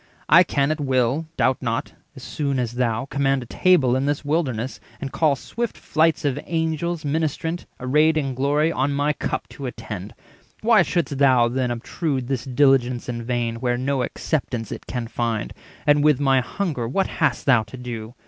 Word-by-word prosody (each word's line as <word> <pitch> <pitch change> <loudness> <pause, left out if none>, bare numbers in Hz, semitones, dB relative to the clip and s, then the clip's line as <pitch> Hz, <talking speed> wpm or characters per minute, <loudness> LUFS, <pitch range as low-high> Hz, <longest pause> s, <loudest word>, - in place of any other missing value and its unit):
I 170 - +8
can 145 -5 +1
at 155 - -2
will, 135 +2 +1
doubt 130 0 +2
not, 115 -2 -2 0.2
as 130 - -11
soon 140 -1 -2
as 120 -3 -1
thou, 120 -1 0
Command 135 -1 0
a - - -11
table 135 -2 +3
in 135 +2 0
this 145 0 -1
wilderness, 135 -6 -1 0.2
And 135 -1 -5
call 155 -3 +2
swift 235 - -4
flights 160 0 +1
of 140 0 0
Angels 160 0 -1
ministrant, 160 +3 -2
Arrayed 150 +5 +3
in 135 -3 -1
glory, 145 +5 +1
on 140 -1 0
my 145 +1 +1
cup - - -3
to 140 - -7
attend: 110 -4 -7 0.5
Why 220 -2 +5
shouldst 170 -5 -1
thou, 130 -4 +5
then, 125 0 -1
obtrude 130 +2 -3
this 130 -2 -2
diligence 130 -2 +2
In 120 -1 -3
vain, 120 -1 -2
where 120 0 0
no 135 +1 0
acceptance 125 -4 -2
it - - -7
can 120 -2 -3
find? 115 -2 -2 0.3
And 145 0 +4
with 150 -3 +4
my 135 -2 +3
hunger 140 -4 -3
what 190 +11 +1
hast - - -1
thou 130 -5 +5
to 110 +4 -10
do? 120 -2 -7
135 Hz, 180 wpm, -23 LUFS, 125-150 Hz, 0.5 s, I